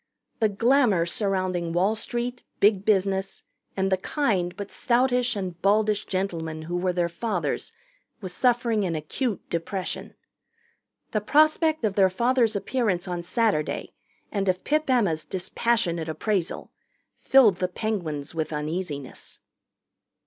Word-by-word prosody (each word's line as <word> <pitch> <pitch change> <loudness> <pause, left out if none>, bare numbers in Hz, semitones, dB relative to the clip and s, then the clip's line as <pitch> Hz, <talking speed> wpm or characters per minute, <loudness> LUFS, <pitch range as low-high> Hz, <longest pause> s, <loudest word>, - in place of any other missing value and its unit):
The 220 -2 +3
glamour 230 -4 +3
surrounding 185 -3 -1
Wall 190 +5 +2
Street, 240 +2 -3 0.2
Big 200 -1 +4
Business, 195 -2 +1 0.3
and 195 0 +1
the 190 - +3
kind 185 - -1
but 200 -1 -6
stoutish 250 -1 +2
and 180 -4 -5
baldish 210 +1 +2
gentlemen 165 -5 -3
who 175 +2 -4
were 180 +1 +1
their 175 -1 0
fathers 180 +2 -2 0.5
was 185 -5 -6
suffering 235 -3 +2
an 175 -3 -1
acute 195 - -3
depression. 180 +3 -4 1.0
The 215 - 0
prospect 310 - +3
of 210 - 0
their 195 -1 +4
fathers' 235 +3 +2
appearance 200 -5 -1
on 175 -1 -3
Saturday 200 -4 -1 0.4
and 200 -2 0
of 185 0 0
Pip 305 0 0
Emma's 195 -12 +2
dispassionate 185 -2 -1
appraisal 180 +3 -2 0.5
filled 235 -9 +5
the 180 - 0
Penguins 175 -8 -3
with 160 -1 -2
uneasiness. 150 -2 -5
195 Hz, 125 wpm, -25 LUFS, 175-230 Hz, 1.0 s, filled